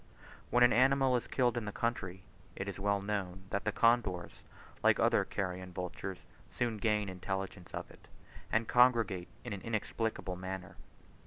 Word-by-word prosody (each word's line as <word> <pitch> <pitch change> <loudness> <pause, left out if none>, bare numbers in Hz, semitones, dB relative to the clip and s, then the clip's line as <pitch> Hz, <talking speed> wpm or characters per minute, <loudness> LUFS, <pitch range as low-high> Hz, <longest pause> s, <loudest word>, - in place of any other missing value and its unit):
When 120 +1 +5
an 120 - +6
animal 130 +1 +4
is 120 - -1
killed 125 -2 +1
in 115 - -2
the 105 - -3
country, 95 -5 -2 0.3
it 95 - -4
is 100 - -5
well 100 0 +1
known 95 -2 -3
that 100 +1 -1
the 105 - +2
condors, 110 -7 +2 0.4
like - - +4
other - - +4
carrion 90 -1 -4
vultures, 90 +1 -5 0.2
soon 120 -2 -1
gain 105 -1 +1
intelligence 95 0 -4
of - - -6
it, - - -17 0.4
and 110 0 +2
congregate 115 -8 +4 0.2
in 120 -3 -4
an 100 - -6
inexplicable 110 -4 -2
manner. 95 0 -6
100 Hz, 160 wpm, -33 LUFS, 95-115 Hz, 0.4 s, an